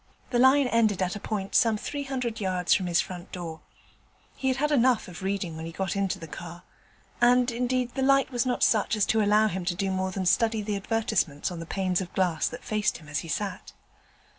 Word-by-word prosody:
The 240 - +2
line 265 +2 +6
ended 230 -5 +2
at 180 +1 -2
a - - -5
point 195 -2 -4
some 225 -2 +4
three 285 +6 -5
hundred 250 -4 -3
yards 185 -2 +1
from 185 - +1
his 170 -2 +2
front 175 +2 -5
door. 165 -3 -6 0.8
He 265 - -3
had 260 0 +1
had 300 +2 0
enough 255 -4 +3
of 180 0 -10
reading 190 -3 -2
when 160 +1 -6
he - - -6
got 190 +3 -3
into 195 -1 0
the 165 - -9
car, 170 +2 -9 0.6
and 245 +1 +4
indeed 250 +1 -1
the 270 - -2
light 275 0 +3
was 245 -2 +1
not 250 -2 0
such 215 0 +3
as 210 -2 +2
to 220 +1 +2
allow 210 +1 +4
him 190 -3 -2
to 175 0 0
do 195 +1 -1
more 190 0 -1
than 185 0 -3
study 220 +3 +2
the 205 0 -2
advertisements 195 -8 -1
on 175 - -6
the 165 - -7
panes 185 -1 0
of 180 - -7
glass 175 -4 +1
that 245 - -7
faced 215 -1 0
him 155 - -16
as 145 0 -2
he 165 - -8
sat. 195 +3 -4
205 Hz, 230 wpm, -27 LUFS, 180-240 Hz, 0.8 s, line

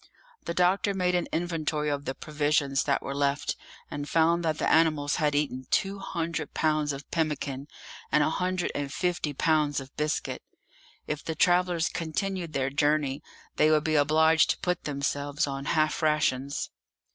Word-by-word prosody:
The 170 - -3
doctor 190 +3 +2
made 180 -1 +1
an 175 -1 +1
inventory 160 -3 -1
of 145 -1 -2
the 130 - -3
provisions 145 -2 0
that 140 - +1
were 140 - -4
left, 140 +1 0 0.4
and 145 0 -5
found 170 +1 +3
that 160 -2 0
the - - 0
animals 155 -3 +3
had 150 -1 +1
eaten 135 -3 -1
two 195 +1 0
hundred 165 -5 -4
pounds 155 -1 +1
of 140 +1 -7
pemmican 150 -4 -2 0.4
and 150 - +4
a 155 - +1
hundred 180 +1 -1
and 145 -1 -3
fifty 175 -2 -1
pounds 150 0 +1
of 135 0 -11
biscuit; 150 0 -2 0.6
if 150 -1 -4
the 160 - -3
travellers 175 -1 +3
continued 170 +1 -3
their 135 -1 0
journey 145 -1 +1 0.4
they 155 - +5
would 155 -1 +3
be 155 - 0
obliged 160 +2 +4
to - - +1
put 180 -1 -1
themselves 145 0 -1
on 140 -1 -5
half 155 -1 +1
rations. 145 -3 0
155 Hz, 165 wpm, -28 LUFS, 145-165 Hz, 0.6 s, they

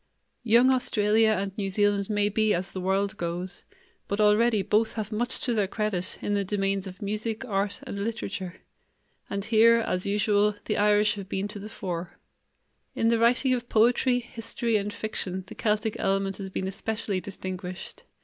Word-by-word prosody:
Young 240 +3 +5
Australia 220 -3 +3
and 195 0 -3
New 195 -1 -1
Zealand 205 0 +1
may 205 -1 +2
be 215 +1 +2
as 185 +2 -4
the 185 - -5
world 195 +3 0
goes, 175 +1 -4 0.4
but 200 - -2
already 210 0 +4
both 220 +3 +1
have 215 -1 -4
much 235 +3 0
to 245 - +1
their 210 -3 +1
credit 200 -3 -2
in 205 - 0
the 200 -1 +1
domains 195 0 -1
of 185 +2 -9
music, 215 +4 -3
art, 200 -3 -1
and 200 - -5
literature; 200 -4 -4 0.7
and 200 0 -3
here, 225 +1 +6
as 185 -5 -1
usual, 205 0 +2
the - - -1
Irish 210 0 +4
have 195 -1 -7
been 195 +1 -2
to 205 - -6
the 210 +2 -8
fore. 180 -5 -5 0.8
In 225 - +2
the 230 -1 +2
writing 250 +3 +3
of 245 -1 -3
poetry, 245 +3 +3
history, 235 -1 -2
and 205 0 0
fiction 195 -4 -3
the - - -10
Celtic 215 0 0
element 195 0 0
has 195 -1 -6
been 190 0 -3
especially 205 0 -3
distinguished. 185 -1 -7
205 Hz, 175 wpm, -27 LUFS, 195-220 Hz, 0.8 s, here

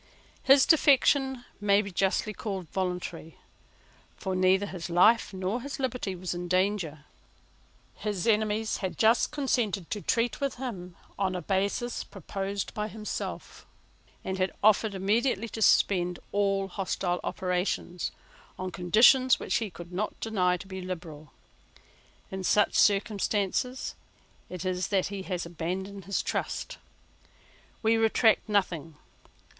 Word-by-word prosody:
His 270 0 +6
defection 270 -4 +4
may 205 0 +3
be 200 - -7
justly 195 +3 0
called 195 -4 -5
voluntary: 180 -3 -4 0.8
for 190 -2 -3
neither 185 +2 +3
his 185 -4 -6
life 210 +8 +4
nor 190 +5 -2
his 280 +2 -6
liberty 250 -7 -2
was 180 0 -4
in 175 0 -5
danger. 185 -5 0 0.9
His 205 -4 -3
enemies 215 0 +1
had 190 -2 -4
just 225 +2 +4
consented 240 - -1
to 210 - -2
treat 235 +6 0
with 275 -2 -1
him 190 -9 -6 0.2
on 190 -2 0
a 180 - -3
basis 200 +5 -1
proposed 195 +1 -5
by 210 0 -2
himself, 215 -1 -6 0.6
and 190 0 -3
had 185 0 +1
offered 215 0 +4
immediately 215 +3 +1
to 220 - -6
suspend 180 -4 +3
all 195 -1 +1
hostile 180 -1 -2
operations, 180 -1 -2 0.5
on 185 0 -4
conditions 230 +9 +5
which - - 0
he 225 -3 -2
could 175 -1 -11
not 205 +4 -3
deny 185 -5 +1
to 180 - -10
be 190 -1 -7
liberal. 165 -5 -7 1.0
In 190 0 -4
such 210 +2 +3
circumstances 205 +4 +1 0.6
it 180 0 -6
is 185 0 -1
that 195 -2 +1
he 195 - -4
has 180 -2 -2
abandoned 185 +3 -5
his 200 +1 -1
trust. - - -3 1.0
We 225 +1 +4
retract 225 0 +3
nothing. 170 -6 0
195 Hz, 130 wpm, -28 LUFS, 180-220 Hz, 1.0 s, His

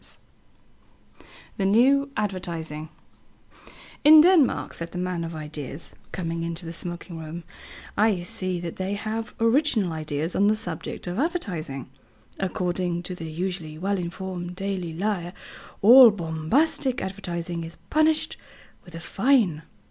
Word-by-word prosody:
_" - - -13 1.4
THE 195 - 0
NEW 270 +7 +4
ADVERTISING 170 -6 -3 1.1
"In 310 +2 +10
Denmark," 330 -4 +4
said 170 0 -6
the - - -5
man 180 -1 -2
of 165 0 -5
ideas, 150 -1 -7 0.2
coming 165 -2 -3
into 170 +1 -4
the 165 - -5
smoking 175 0 -6
room, 160 +2 -7 0.5
"I 210 -4 +3
see 185 0 -2
that 170 -1 -6
they 190 +2 -2
have 220 +1 -4
original 230 - +2
ideas 155 +1 -3
on 200 - +4
the 215 - +4
subject 175 -7 -6
of 180 +4 -3
advertising. 180 - -2 0.5
According 180 -2 -1
to 180 - -5
the 165 -3 -7
usually 165 -2 -4
well 195 +3 -1
informed 180 0 -5
Daily 190 -3 -3
Lyre, 175 0 -2 0.5
all 245 +3 +10
'bombastic' 215 - 0
advertising 175 -3 -4
is 165 +1 -8 0.2
punished 310 0 +2 0.5
with 175 -4 -13
a - - -5
fine. 195 - +2
180 Hz, 135 wpm, -25 LUFS, 165-215 Hz, 1.4 s, In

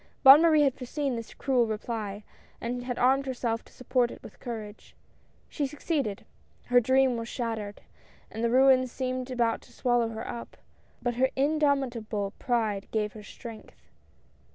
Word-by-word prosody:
Bonne 275 +3 +10
Marie 315 -3 +5
had 275 -3 +3
foreseen 270 +1 -3
this 230 -1 -7
cruel 255 -4 +2
reply, 215 -2 -4 0.4
and 245 +1 -4
had 245 -1 -3
armed 270 +2 +3
herself 240 -3 -2
to - - -20
support 250 -1 0
it - - -11
with - - -12
courage. 220 -3 -8 0.5
She 290 -3 -2
succeeded. 280 - -2 0.4
Her 245 0 +5
dream 260 +1 +3
was 230 0 -4
shattered, 220 -4 -4 0.5
and 225 +1 -4
the 235 - +3
ruins 255 0 +5
seemed 255 0 -3
about 235 -3 0
to - - -19
swallow 240 -2 +1
her 225 0 -6
up; 235 -1 -7 0.5
but 245 0 0
her 260 +1 +3
indomi 280 -2 +2
table 210 -3 -4
pride 220 -6 0
gave 210 -1 -1
her 215 - -10
strength. 225 +1 -12
245 Hz, 160 wpm, -28 LUFS, 225-265 Hz, 0.5 s, Bonne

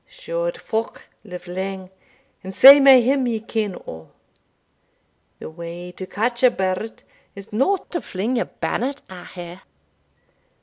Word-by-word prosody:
Shored - - -4
folk 225 +1 -5
live 180 -4 -10
lang, 190 +1 -5 0.5
and 190 0 -8
sae 275 +2 +10
may 270 -3 +7
him 265 +1 +1
ye 230 -2 -1
ken 215 -3 -3
o'. 80 0 -10 1.3
The - - -9
way 170 +2 -8
to 185 +1 -9
catch 235 +5 -2
a 255 - +7
bird 190 +1 -4 0.3
is 200 +1 -12
no 270 - +2
to 345 - -3
fling 215 +7 -3
your - - 0
bannet 275 +3 -4
at 180 -1 -10
her. 175 +1 -9
215 Hz, 140 wpm, -21 LUFS, 185-255 Hz, 1.3 s, sae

